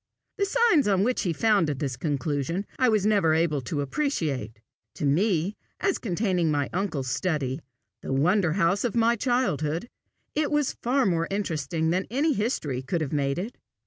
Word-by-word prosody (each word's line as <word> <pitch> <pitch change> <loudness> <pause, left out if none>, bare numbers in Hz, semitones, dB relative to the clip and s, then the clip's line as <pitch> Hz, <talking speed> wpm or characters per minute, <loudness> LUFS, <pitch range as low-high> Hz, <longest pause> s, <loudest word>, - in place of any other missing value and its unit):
The 400 - +2
signs 450 - +3
on 195 -1 +3
which 250 +3 +1
he 180 - 0
founded 165 -6 +2
this 135 -2 -2
conclusion, 145 - -2
I 255 -1 +4
was 215 -3 +2
never 200 -7 +3
able 160 -3 +1
to 145 +4 -3
appreciate: 140 - -2 0.4
to - - -3
me, 180 +5 +1 0.2
as 390 -2 0
containing 185 -4 0
my 145 -2 0
uncle's 175 -8 -2
study, 145 -1 -1 0.4
the - - -5
wonder 170 +5 +2
house 190 +1 +2
of 240 -3 -1
my 235 0 +4
childhood, 205 - 0 0.5
it 305 -1 0
was 295 -2 +1
far 260 +2 +2
more 165 -3 +1
interesting 160 -5 -1
than 185 +2 0
any 290 +7 +1
history 180 - -1
could 165 +6 -2
have 150 -2 -3
made 140 -2 0
it. 205 +7 -4
175 Hz, 170 wpm, -26 LUFS, 150-225 Hz, 0.5 s, I